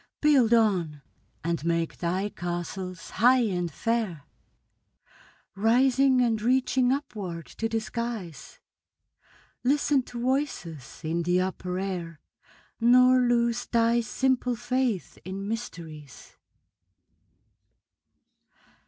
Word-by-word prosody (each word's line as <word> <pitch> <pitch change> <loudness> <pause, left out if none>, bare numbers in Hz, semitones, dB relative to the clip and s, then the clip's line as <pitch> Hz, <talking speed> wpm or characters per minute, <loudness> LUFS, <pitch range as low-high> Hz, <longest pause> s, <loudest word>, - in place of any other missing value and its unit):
Build 275 -7 +4
on, 180 -11 +2 0.4
and 170 -2 -2
make 170 0 -1
thy 185 +4 -1
castles 175 0 -5
high 250 +3 +4
and 180 -6 -1
fair, 215 -4 -2 1.3
Rising 255 +5 +3
and 225 -3 +1
reaching 255 +1 +2
upward 200 - -4
to 225 - 0
the 225 0 0
skies; 220 -7 -6 1.1
Listen 285 +1 +2
to 245 -1 -9
voices 235 - -3
in 165 +2 -1
the 180 +2 +2
upper 185 -1 -3
air, 180 -4 -4 0.6
Nor 250 +2 +6
lose 240 -1 +1
thy 235 0 +2
simple 250 +2 0
faith 245 -4 -2
in 195 +2 -5
mysteries. 165 - -7
225 Hz, 95 wpm, -27 LUFS, 175-245 Hz, 1.3 s, Nor